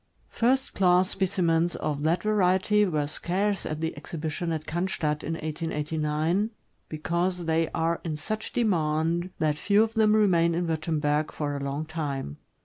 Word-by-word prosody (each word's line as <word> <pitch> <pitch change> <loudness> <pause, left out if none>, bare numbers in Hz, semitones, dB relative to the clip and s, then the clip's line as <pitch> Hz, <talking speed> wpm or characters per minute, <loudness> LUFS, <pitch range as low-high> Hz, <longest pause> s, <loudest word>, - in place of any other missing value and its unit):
First 260 +3 +1
class 185 0 +3
specimens 175 -3 +1
of 145 -1 -2
that 160 +4 +1
variety 210 0 +3
were 150 -4 0
scarce 190 +6 -1
at 155 0 -4
the 160 0 -2
exhibition 165 +1 -4
at 155 -1 -3
Oannstadt, 160 -3 -1
in 165 - -2
1889, 155 +3 -1 0.4
because 170 +3 -1
they 165 0 +1
are 165 +1 -1
in 155 -3 -3
such 215 +7 -4
demand 170 -4 +1
that 150 -1 0
few 205 +4 +4
of 225 0 -3
them 215 -2 +4
remain 170 -6 +3
in 175 +1 0
Wurtemberg 155 -2 0
for 145 -1 -3
a - - -3
long 140 +3 -3
time. 145 - -4
165 Hz, 150 wpm, -27 LUFS, 155-185 Hz, 0.4 s, few